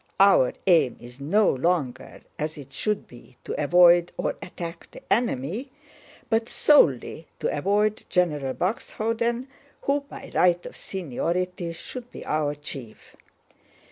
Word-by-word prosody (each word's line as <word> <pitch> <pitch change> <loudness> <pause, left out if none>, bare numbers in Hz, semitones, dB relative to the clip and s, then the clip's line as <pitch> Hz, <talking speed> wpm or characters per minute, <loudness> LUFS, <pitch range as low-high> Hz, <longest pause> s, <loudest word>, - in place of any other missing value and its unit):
Our 195 -10 +6
aim 165 -9 +4
is 120 +2 -13
no 200 +9 +3
longer, 135 -3 -1 0.2
as 155 +1 -3
it 135 -1 -11
should 210 +7 -1
be, 125 +1 -16
to - - -4
avoid 175 +1 +6
or - - -1
attack 170 -2 -7
the - - -13
enemy, 220 - -1 0.6
but 225 0 +1
solely 160 - +3
to - - -1
avoid 205 +7 +1
General 150 -7 +1
Buxhöwden 230 +4 -1 0.4
who 280 +1 +2
by 280 - -11
right 175 -1 +3
of - - -8
seniority 180 +1 -3
should 245 +8 -8
be - - -9
our 150 -1 0
chief. 135 -6 -9
175 Hz, 130 wpm, -25 LUFS, 145-210 Hz, 0.6 s, Our